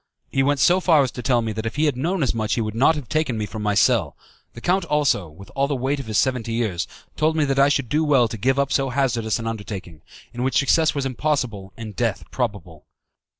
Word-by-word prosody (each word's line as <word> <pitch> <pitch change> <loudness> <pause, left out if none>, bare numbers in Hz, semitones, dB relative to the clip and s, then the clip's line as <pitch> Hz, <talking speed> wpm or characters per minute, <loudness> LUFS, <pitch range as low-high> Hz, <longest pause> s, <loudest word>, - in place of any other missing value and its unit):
He 135 - +2
went 140 +1 +1
so 180 +6 +5
far 165 -6 +4
as 130 - -2
to 125 - -7
tell 120 -2 +2
me 110 - -2
that 110 +1 -4
if 115 - -5
he 150 +2 +2
had 145 -4 +1
known 165 +6 -1
as 130 - +1
much 110 -1 -1
he 120 - 0
would 110 -1 -3
not 135 +8 +4
have 145 -5 -6
taken 155 -6 0
me 105 - -2
from 105 +1 -7
my 105 -1 0
cell. 110 - +2 0.4
The - - -10
count 180 +8 +1
also, 145 - +1
with 90 +6 -14
all 140 0 +1
the 140 - -1
weight 135 +3 -1
of 135 - -7
his 110 - -1
seventy 125 -4 0
years, 110 -7 -1 0.3
told 155 +1 +1
me 155 -2 +2
that 135 -1 0
I 140 +1 +6
should 140 -3 0
do 155 +6 +1
well 135 -6 +4
to 115 - -6
give 130 +6 +1
up 140 0 +1
so 135 -1 +1
hazardous 120 -4 0
an 115 - -6
undertaking, 100 -7 -6 0.3
in 120 - -5
which 130 +1 +1
success 155 +3 +3
was 140 -1 -1
impossible 125 -7 -2
and 110 -3 -8
death 115 -4 -1
probable. 95 - -4
125 Hz, 255 wpm, -22 LUFS, 110-140 Hz, 0.4 s, I